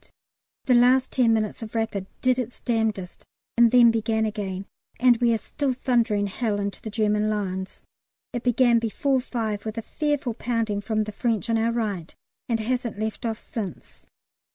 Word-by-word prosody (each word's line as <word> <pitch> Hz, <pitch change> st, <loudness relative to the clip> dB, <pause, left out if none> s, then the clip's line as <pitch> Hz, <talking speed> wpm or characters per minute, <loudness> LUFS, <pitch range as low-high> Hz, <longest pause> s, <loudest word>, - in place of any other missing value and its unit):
The 255 Hz, -, +3 dB
last 250 Hz, +2 st, +5 dB
ten 245 Hz, -3 st, +3 dB
minutes 215 Hz, -1 st, 0 dB
of 225 Hz, 0 st, -8 dB
"Rapid" 220 Hz, -4 st, -1 dB
did 255 Hz, 0 st, +3 dB
its 245 Hz, -1 st, -5 dB
damnedest 220 Hz, -6 st, -2 dB, 0.3 s
and 235 Hz, 0 st, +6 dB
then 240 Hz, -1 st, +7 dB
began 220 Hz, 0 st, 0 dB
again, 200 Hz, -3 st, -4 dB, 0.3 s
and 245 Hz, -1 st, +5 dB
we 240 Hz, 0 st, +3 dB
are 225 Hz, -, +3 dB
still 265 Hz, +5 st, -2 dB
thundering 235 Hz, -5 st, +1 dB
hell 205 Hz, +1 st, -1 dB
into 200 Hz, 0 st, -4 dB
the 220 Hz, -, -6 dB
German 210 Hz, -1 st, +1 dB
lines. 190 Hz, -3 st, -3 dB, 0.5 s
It 245 Hz, -, -2 dB
began 245 Hz, -1 st, +4 dB
before 255 Hz, +4 st, 0 dB
5 220 Hz, -5 st, -3 dB
with 220 Hz, 0 st, -5 dB
a 225 Hz, -, -3 dB
fearful 290 Hz, -4 st, -1 dB
pounding 225 Hz, -3 st, -1 dB
from 215 Hz, +1 st, 0 dB
the 215 Hz, -, -6 dB
French 230 Hz, +1 st, -1 dB
on 225 Hz, -, +3 dB
our 230 Hz, +1 st, +2 dB
right, 205 Hz, -8 st, -3 dB, 0.3 s
and 230 Hz, -1 st, +1 dB
hasn't 240 Hz, 0 st, -2 dB
left 220 Hz, +2 st, -3 dB
off 225 Hz, -1 st, -2 dB
since. 205 Hz, -6 st, -7 dB
225 Hz, 175 wpm, -25 LUFS, 210-245 Hz, 0.5 s, then